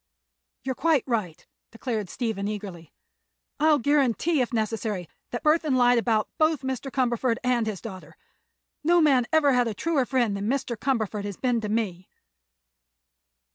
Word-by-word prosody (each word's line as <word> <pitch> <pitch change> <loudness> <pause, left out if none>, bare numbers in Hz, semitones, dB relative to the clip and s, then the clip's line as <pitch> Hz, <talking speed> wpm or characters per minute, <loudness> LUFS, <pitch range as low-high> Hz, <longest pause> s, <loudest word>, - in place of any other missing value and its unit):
"You 265 - -2
are - - 0
quite 310 -1 +2
right," 215 - -3 0.2
declared 225 -4 -4
Stephen, 220 -4 -3
eagerly. 195 -6 -6 0.7
"I'll 305 0 +5
guarantee, 285 +2 +2
if 245 - -1
necessary, 220 -5 -2 0.2
that 240 - -5
Burthon 305 -2 +3
lied 245 -1 +4
about 225 -2 +1
both 310 -3 +2
Mr. 265 +1 -3
Cumberford 245 -2 0
and 245 -3 +1
his 210 -4 -4
daughter. 190 -5 -10 0.7
No 345 +3 +4
man 270 -7 +4
ever 305 -4 +4
had 245 -1 +3
a 220 - -3
truer 290 - 0
friend 240 -6 +1
than 200 +2 -2
Mr. 260 -2 -1
Cumberford 220 -4 -1
has 200 -2 -5
been 245 -3 0
to 210 - -4
me." 195 -5 -2
240 Hz, 155 wpm, -26 LUFS, 215-270 Hz, 0.7 s, I'll